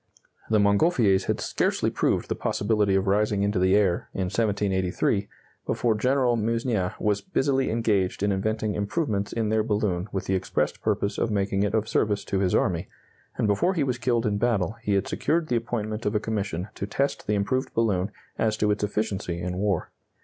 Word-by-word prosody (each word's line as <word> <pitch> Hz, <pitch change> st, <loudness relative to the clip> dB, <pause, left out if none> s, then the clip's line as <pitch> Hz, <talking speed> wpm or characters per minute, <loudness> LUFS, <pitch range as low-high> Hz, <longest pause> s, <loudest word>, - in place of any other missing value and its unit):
The 110 Hz, -, +4 dB
Montgolfiers 100 Hz, -, +3 dB
had -, -, -1 dB
scarcely -, -, 0 dB
proved -, -, 0 dB
the -, -, -1 dB
possibility 105 Hz, -2 st, +1 dB
of 95 Hz, 0 st, +2 dB
rising 105 Hz, 0 st, +2 dB
into 100 Hz, -2 st, +1 dB
the 95 Hz, +1 st, +4 dB
air, 95 Hz, -4 st, +1 dB
in -, -, -1 dB
1783, 100 Hz, -2 st, 0 dB, 0.4 s
before 120 Hz, -2 st, +1 dB
General 125 Hz, +2 st, +2 dB
Meusnier 115 Hz, -3 st, -1 dB
was 105 Hz, -1 st, +1 dB
busily 135 Hz, -7 st, 0 dB
engaged 105 Hz, -5 st, 0 dB
in 100 Hz, -, +2 dB
inventing 110 Hz, +2 st, -1 dB
improvements 100 Hz, -1 st, -1 dB
in 110 Hz, -2 st, -1 dB
their 110 Hz, 0 st, +2 dB
balloon 105 Hz, -4 st, -1 dB
with 95 Hz, -, -3 dB
the 95 Hz, -, -1 dB
expressed 95 Hz, -, -1 dB
purpose 100 Hz, 0 st, -1 dB
of -, -, +1 dB
making 100 Hz, -2 st, 0 dB
it 105 Hz, +1 st, +1 dB
of 110 Hz, 0 st, 0 dB
service 105 Hz, -2 st, 0 dB
to 95 Hz, -, -1 dB
his 95 Hz, -2 st, +1 dB
army, -, -, +1 dB, 0.5 s
and -, -, +1 dB
before 165 Hz, -, +2 dB
he 155 Hz, -, +1 dB
was 125 Hz, -2 st, -1 dB
killed 120 Hz, -1 st, +1 dB
in 100 Hz, -1 st, 0 dB
battle 105 Hz, -4 st, +1 dB
he 105 Hz, -3 st, 0 dB
had 100 Hz, -, 0 dB
secured 160 Hz, 0 st, 0 dB
the 120 Hz, -, +1 dB
appointment 115 Hz, -2 st, -2 dB
of 105 Hz, -, -1 dB
a -, -, +3 dB
commission 100 Hz, -4 st, -3 dB
to 100 Hz, -, -5 dB
test 140 Hz, +6 st, -1 dB
the 105 Hz, -, +2 dB
improved 105 Hz, +7 st, -1 dB
balloon 100 Hz, -4 st, +1 dB, 0.3 s
as 110 Hz, -1 st, +1 dB
to 105 Hz, -1 st, +2 dB
its 105 Hz, 0 st, -1 dB
efficiency 100 Hz, -4 st, -2 dB
in 90 Hz, +1 st, -3 dB
war. 100 Hz, -3 st, -1 dB
105 Hz, 190 wpm, -26 LUFS, 100-115 Hz, 0.5 s, The